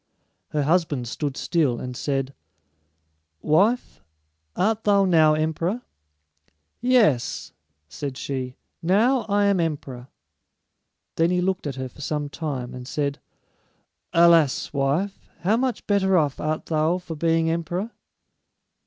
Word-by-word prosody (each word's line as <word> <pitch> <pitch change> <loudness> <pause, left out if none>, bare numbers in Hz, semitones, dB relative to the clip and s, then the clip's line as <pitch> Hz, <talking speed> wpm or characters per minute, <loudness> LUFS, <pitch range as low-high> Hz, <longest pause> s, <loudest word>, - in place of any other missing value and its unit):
Her 150 -1 -1
husband 150 -5 +1
stood 140 +3 -3
still, 145 -9 +1
and 125 -1 -6
said, 135 0 -2 1.1
"Wife, 205 +11 +2 0.5
art 220 +3 +1
thou 200 -1 +4
now 160 -4 +5
emperor?" 165 +9 -1 1.0
"Yes," 230 - +2 0.3
said 135 - -6
she; 130 -2 -4 0.3
"now 220 +8 +3
I 205 0 +3
am 200 -2 +3
emperor." 140 -6 -3 1.1
Then 165 +1 +3
he 180 0 +1
looked 185 -3 -1
at 135 - -4
her 130 -1 -4
for 130 - -14
some 145 0 -2
time, 140 -5 -4
and 125 0 -8
said, 140 -1 -2 0.9
"Alas, 165 -6 +4
wife, 150 +9 -1
how 200 +5 +2
much 255 +1 -1
better 190 -2 +3
off 145 -4 +1
art 155 0 -2
thou 160 +2 +1
for 180 -2 -7
being 165 +1 +1
emperor?" 175 +6 -3
160 Hz, 125 wpm, -24 LUFS, 140-190 Hz, 1.1 s, now